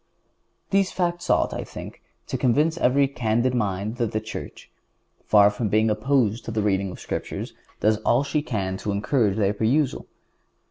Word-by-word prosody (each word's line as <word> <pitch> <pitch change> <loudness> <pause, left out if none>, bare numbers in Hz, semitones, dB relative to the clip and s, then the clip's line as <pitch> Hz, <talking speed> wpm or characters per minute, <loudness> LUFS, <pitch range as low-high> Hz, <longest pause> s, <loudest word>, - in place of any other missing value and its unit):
These 195 -1 +2
facts 175 -1 -2
ought, - - +2
I - - -4
think, - - -10 0.2
to - - -4
convince 150 +6 +2
every 135 +2 +3
candid 125 -1 0
mind 105 -1 -2
that 115 -2 -1
the 110 - +1
Church, 110 0 -8 0.6
far 105 -1 +6
from 105 +1 -2
being 110 +2 +3
opposed 115 0 +1
to - - -4
the 110 -1 -1
reading 100 -1 +1
of 90 - -7
the - - -14
Scriptures, - - -5 0.3
does 110 0 +3
all 120 +4 +2
she 145 +2 -1
can 100 -9 -3
to 105 - -5
encourage 105 0 +1
their 100 -2 +2
perusal. 130 +7 0
110 Hz, 175 wpm, -24 LUFS, 105-135 Hz, 0.6 s, far